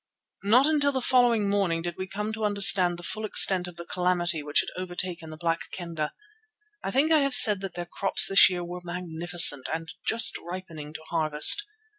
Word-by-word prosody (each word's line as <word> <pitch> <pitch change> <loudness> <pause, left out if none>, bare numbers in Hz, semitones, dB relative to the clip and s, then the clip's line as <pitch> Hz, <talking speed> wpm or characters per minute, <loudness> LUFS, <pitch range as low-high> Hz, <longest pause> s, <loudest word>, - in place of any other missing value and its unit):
Not 230 +7 +2
until 290 -2 0
the 265 - -4
following 240 -4 0
morning 195 -5 -2
did 175 -1 -6
we 185 - -8
come 210 +3 -7
to 220 0 -7
understand 195 -4 +4
the 175 - -13
full 215 +5 -6
extent 190 -3 +2
of 175 - -12
the 170 0 -11
calamity 175 -2 -2
which 145 0 0
had - - -9
overtaken 175 -2 -7
the 155 - -11
Black 165 0 -4
Kendah. 165 -4 -6 0.7
I - - -5
think 280 +9 -1
I 315 - +3
have 275 -2 0
said 210 -5 +7
that 195 -3 -9
their 175 - -7
crops 195 +3 +1
this 195 0 +5
year 180 -1 -6
were 180 +1 -9
magnificent 175 -4 +2
and 160 +1 -7
just 230 0 +3
ripening 165 -4 -11
to - - -9
harvest. 160 - +3
180 Hz, 195 wpm, -24 LUFS, 170-210 Hz, 0.7 s, said